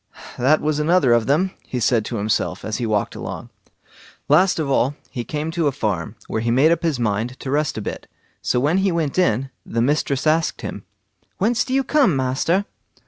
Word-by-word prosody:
"That 140 +5 +3
was 150 0 0
another 150 -5 +3
of 115 -2 +2
them", 170 +7 +2 0.2
he 125 - -3
said 115 -2 +2
to 120 - -4
himself, 100 -3 -1
as 110 -1 -2
he 120 -2 -2
walked 105 -2 0
along. - - -7 0.8
Last 180 +6 +4
of 155 -3 -1
all, 135 +1 +1 0.2
he 120 - -4
came 150 +6 -3
to 165 -2 0
a - - +2
farm, 105 - -3
where 110 - -2
he 115 - -1
made 135 +7 +4
up 170 - +1
his 160 -6 0
mind 115 +3 -1
to 130 - -5
rest 150 -2 0
a - - -2
bit. - - -6 0.3
So 125 - +1
when 150 +8 +2
he 195 0 +2
went 165 -1 -1
in, 135 -6 +1
the 115 - -3
mistress 140 +2 +1
asked 160 +1 +1
him: - - -6 0.5
"Whence 225 +4 +2
do - - -8
you 270 - +3
come, 270 - +3
master?" 135 +9 +1
140 Hz, 205 wpm, -21 LUFS, 120-165 Hz, 0.8 s, Last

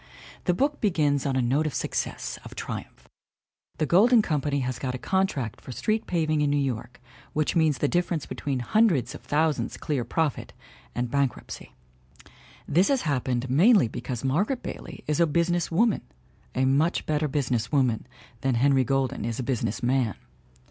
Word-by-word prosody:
The 180 - +2
book 285 +7 0
begins 150 - +1
on 135 - 0
a 130 - +2
note 140 +6 +1
of 150 - -4
success, - - -3
of - - -11
triumph; - - -7 0.7
the 155 - +1
Golden 215 - +5
Company 145 -4 0
has 125 -1 -3
got' 130 -2 -2
a - - -3
contract 150 - -1
for - - -9
street 215 - -1
paving 155 -3 +1
in 145 - +2
New 145 - +2
York 125 -3 -3 0.3
which 155 +3 0
means 160 -4 +3
the 145 - +1
difference 175 -1 0
between 135 -4 -3
hundreds 180 - +2
of - - -12
thou 155 +2 +3
sands - - -4
clear 145 -5 -2
profit 155 +1 -2 0.4
and 120 -1 -2
bankruptcy. 140 -2 -2 0.9
This 180 +6 +3
has 275 -2 +1
happened 130 -4 -1
mainly 175 - +5
because 120 +1 -5
Margaret 190 - 0
Bailey - - -7
is 150 +1 0
a 170 - +5
business 170 +2 +1
woman 220 +6 +2 0.5
a 130 - +2
much 145 +6 +2
better 155 0 0
business 130 -5 -1
woman 130 -6 +1 0.3
than 135 -1 0
Henry 135 +2 +4
Golden 135 0 0
is 115 0 -3
a 130 - -2
business 115 -4 -2
man. 125 -4 +1
145 Hz, 170 wpm, -26 LUFS, 130-170 Hz, 0.9 s, Golden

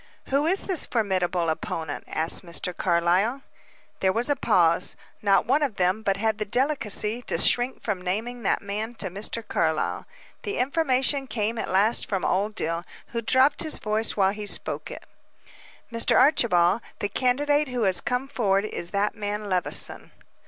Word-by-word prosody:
"Who 280 +3 +2
is 380 +3 +1
this 370 -6 +3
formidable 185 -6 0
opponent?" 160 -1 -5
asked 160 +4 +1
Mr. 175 0 -3
Carlyle. 185 +9 +1 0.6
There 190 - +2
was 235 +8 0
a - - +3
pause. 175 -10 +2 0.3
Not 200 -2 +3
one 275 +5 +2
of 275 -8 -1
them 185 +3 +1
but 195 -2 0
had 220 +1 -1
the - - 0
delicacy 245 -3 -1
to - - 0
shrink 245 +2 +3
from 200 -5 -2
naming 225 +7 -3
that 205 - 0
man 215 +4 -4
to 190 -5 -3
Mr. 210 +3 -3
Carlyle. 160 -1 -1 0.3
The 415 -3 -4
information 270 0 +1
came 225 -1 -2
at - - -3
last 205 +5 +2
from 195 -3 -1
Old 205 +3 0
Dill, 165 0 -2 0.3
who 235 - -3
dropped 260 +5 +3
his 315 -2 0
voice 215 +1 -1
while 195 -1 +3
he 210 0 -6
spoke - - -1
it. - - -9 0.9
"Mr. 230 - +2
Archibald, 225 - +3 0.2
the 205 - -2
candidate 290 +7 +1
who 250 -3 -2
has 190 -3 +3
come 250 +2 -2
forward, 205 -7 +1
is 170 -5 -3
that 200 +2 0
man 210 0 -4
Levison." 180 -2 -2
215 Hz, 165 wpm, -25 LUFS, 190-250 Hz, 0.9 s, this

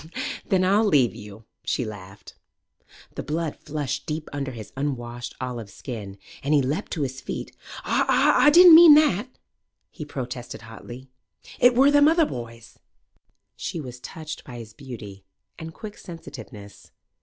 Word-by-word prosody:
"Then 185 -1 +2
I'll 200 +4 +3
leave 140 - +3
you," 105 -1 -12 0.2
she 125 - -1
laughed. 100 -2 -10 0.8
The - - -5
blood 160 0 -3
flushed 140 -3 -5
deep 155 0 -4
under 140 -1 -3
his 110 -3 -10
unwashed 120 -3 -4
olive 120 -5 -5
skin, 100 -2 -8 0.2
and 145 +3 +1
he 145 - +4
leaped 150 +10 -3
to 155 - -1
his 130 -1 -5
feet. - - -6 0.3
"Aw 295 - +4
didn't 350 +2 +9
mean 325 -2 +10
that!" 255 - +3 0.6
he - - -8
protested 125 -5 -7
hotly. 120 +3 -11 0.5
"It 245 0 +5
wur 275 +3 +5
them 290 0 +6
other 325 0 +4
boys." 115 - -9 0.8
She - - -5
was 125 -4 -8
touched 155 +4 -8
by 125 - -10
his 110 -2 -10
beauty 110 -7 -10 0.4
and 160 0 -7
quick 210 +4 -10
sensitiveness. 110 - -11
135 Hz, 145 wpm, -24 LUFS, 115-170 Hz, 0.8 s, mean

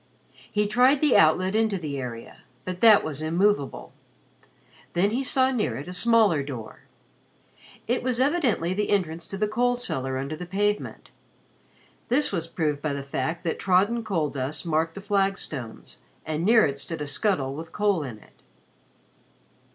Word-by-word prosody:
He 210 -1 +1
tried 250 +7 +4
the 295 -3 +3
outlet 185 +5 +4
into 220 -2 +1
the 150 -5 -4
area, 120 -3 -7 0.3
but 185 -1 -5
that 220 -1 +7
was 155 -1 -5
immovable. 170 -1 0 1.0
Then 190 +4 +2
he 255 +4 -1
saw 260 0 +3
near 210 - -1
it 140 +5 -7
a 180 - -6
smaller 215 -6 +4
door. 130 -6 -8 1.0
It 245 +2 0
was 250 -1 -1
evidently 260 - +1
the 210 +2 -1
entrance 170 -5 -1
to 195 - -6
the 210 +1 0
coal 245 +3 +1
cellar 135 - -3
under 140 +4 -4
the 180 +2 -8
pavement. 205 +3 -2 1.0
This 275 +5 +1
was 165 -4 -2
proved 150 -4 -2
by 150 -1 -2
the 140 -1 -4
fact 140 +5 -3
that 165 - -2
trodden 200 +6 +2
coal 165 -9 -1
dust 140 +4 -4
marked 165 0 0
the 195 - -7
flagstones, 195 - -3 0.3
and 155 +1 -2
near 225 +3 +5
it 140 -2 -3
stood 165 +2 -5
a - - -4
scuttle 145 -2 0
with 160 +3 -8
coal 205 -5 +1
in 125 -6 -6
it. - - -22
180 Hz, 165 wpm, -25 LUFS, 150-215 Hz, 1.0 s, that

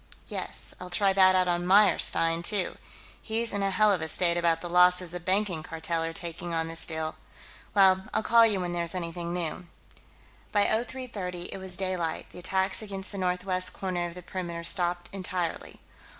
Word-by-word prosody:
"Yes, - - -6
I'll 180 - -8
try 195 +2 +4
that 185 -1 +5
out 185 -1 +3
on 175 0 0
Meyerstein, 180 -3 +4
too. 195 +1 -1 0.4
He's 225 0 -2
in 200 - -1
a 195 - +1
hell 210 +2 +3
of 185 -5 0
a 160 - -2
state 170 +1 +1
about 170 -1 +2
the 175 - -6
losses 180 0 +4
the 180 - -5
Banking 185 -1 0
Cartel 165 +1 -2
are 165 - -2
taking 170 +1 -5
on 165 0 -1
this 165 0 +1
deal.... 160 -1 -3 0.6
Well, 190 -1 +5
I'll - - 0
call 230 +1 +6
you 215 -4 +3
when 175 -1 -3
there's 170 0 -1
anything 170 -1 -4
new." 175 0 -4 0.8
By 205 -1 +3
0330, 220 -7 -3
it - - -6
was 190 -1 -8
daylight; 185 -4 -3
the - - -10
attacks 190 +2 0
against 195 -2 -6
the 200 - -6
northwest 185 0 0
corner 180 -2 -2
of 170 - -10
the 180 - -9
perimeter 175 -2 -5
stopped 175 0 +1
entirely. 180 -3 -4
180 Hz, 185 wpm, -28 LUFS, 170-195 Hz, 0.8 s, call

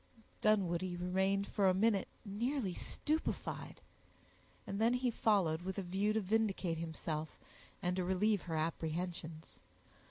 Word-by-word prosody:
Dunwoodie 185 -4 +2
remained 190 +2 +1
for 200 -2 +2
a 185 - +3
minute 205 -1 +3 0.2
nearly 220 +1 -1
stupefied; 310 - -2 0.8
and 200 +2 -3
then 235 +2 +4
he 250 -1 +1
followed 190 -8 +2
with 190 +2 -4
a 195 - -1
view 190 +4 +1
to 220 - +2
vindicate 195 -5 +1
himself, 160 -1 -4 0.5
and 180 0 +1
to 185 - +1
relieve 190 +2 +2
her 165 -2 -4
apprehensions. 160 0 -3
190 Hz, 130 wpm, -36 LUFS, 175-210 Hz, 0.8 s, then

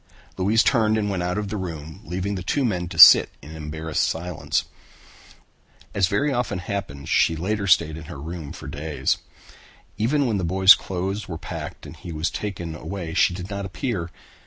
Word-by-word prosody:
Louise 105 +5 +3
turned 110 -4 +3
and 105 -2 -1
went 95 -2 -2
out 90 +2 -2
of 105 -1 -3
the 105 - -3
room, 80 -5 -7
leaving 95 +4 -3
the 95 - -4
two 135 +9 0
men 90 -6 -1
to - - -8
sit - - +10
in 75 +4 -11
embarrassed 80 0 -3
silence. 85 +1 -1 1.3
As 95 -2 +2
very 140 +10 0
often 120 -6 -1
happened 90 -7 -5
she 80 - +3
later 100 +4 -2
stayed 85 -4 +3
in 80 - -9
her 75 - -9
room 80 0 -7
for - - -9
days. 75 0 -2 0.8
Even 140 +6 +2
when 115 -4 0
the - - -2
boy's 95 +3 +7
clothes 95 +3 -4
were 80 - -5
packed - - -7
and - - -10
he 90 -1 -9
was 80 +1 -2
taken 90 -6 -5
away 80 +2 -6
she 90 - +3
did 95 +2 -7
not 100 0 -4
appear. 95 -1 -3
90 Hz, 185 wpm, -23 LUFS, 80-100 Hz, 1.3 s, sit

